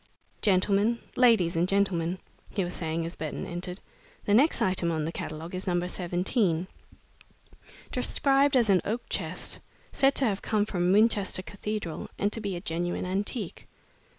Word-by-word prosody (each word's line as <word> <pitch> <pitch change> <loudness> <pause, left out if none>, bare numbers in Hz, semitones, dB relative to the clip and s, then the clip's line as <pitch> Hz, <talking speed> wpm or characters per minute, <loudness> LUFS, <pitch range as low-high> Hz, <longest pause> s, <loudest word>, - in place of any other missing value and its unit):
"Gentlemen 205 +3 +3 0.2
ladies 225 -9 +4
and 170 +2 +2
gentlemen," 185 -3 +1 0.3
he 195 - -1
was 175 0 -4
saying 165 0 -2
as 170 - -5
Burton 155 +4 -4
entered, 180 +1 -5 0.5
"the 205 - +2
next 275 +9 +4
item 180 -2 +1
on 155 -2 -1
the 165 - -2
catalogue 160 +2 -6
is 185 +1 -5
number 175 -1 +1
17, 180 0 0 1.3
described 275 0 +2
as 230 -5 +4
an 185 - +4
oak 230 +4 -2
chest, - - -1 0.3
said 270 0 +3
to 270 - +3
have 200 -4 0
come 210 -2 +1
from 180 -3 0
Winchester 205 -2 +3
Cathedral 205 -4 -5
and 205 +1 0
to 225 - -3
be 200 -3 -3
a 175 - -5
genuine 175 +1 -2
antique." 195 +1 -3
190 Hz, 155 wpm, -28 LUFS, 175-210 Hz, 1.3 s, ladies